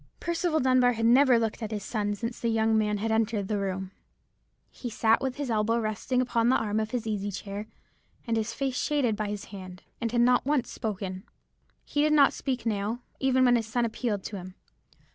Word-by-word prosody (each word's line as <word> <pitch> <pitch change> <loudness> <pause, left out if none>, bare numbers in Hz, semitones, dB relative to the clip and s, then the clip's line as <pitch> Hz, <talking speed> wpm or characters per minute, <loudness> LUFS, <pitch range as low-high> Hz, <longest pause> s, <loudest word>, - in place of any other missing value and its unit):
"Percival 340 -1 0
Dunbar 255 -2 +4
had 225 0 -1
never 250 +1 +6
looked 225 -1 -1
at 220 - -3
his 210 -2 -4
son 205 -1 -2
since 230 +3 -5
the 235 - -1
young 225 0 +2
man 210 -1 +1
had 220 +2 -2
entered 220 -2 0
the 210 -1 -1
room. 190 -1 -3 0.8
He 245 - -6
sat 225 0 +2
with 265 -1 -2
his 285 -4 -3
elbow 220 +1 +2
resting 230 +3 -1
upon 235 -1 +1
the 260 - +4
arm 215 -1 0
of 215 0 -2
his 245 -2 -3
easy 205 -2 -2
chair, 200 +2 -6 0.6
and 230 -2 0
his 220 0 -1
face 260 +2 -2
shaded 275 -7 +1
by 210 0 -2
his 205 0 -5
hand, 185 -2 -9 0.2
and 230 -1 -1
had 240 0 +2
not 250 +1 +4
once 280 -2 0
spoken. 190 -3 -4 0.6
"He 290 - 0
did 305 0 +3
not 285 -2 +6
speak 255 -4 -3
now, 215 +2 -1 0.2
even 260 -1 +3
when 245 -1 +5
his 225 -1 -3
son 235 +2 0
appealed 220 -3 -2
to 205 - -5
him. 185 0 -9
225 Hz, 210 wpm, -28 LUFS, 210-250 Hz, 0.8 s, never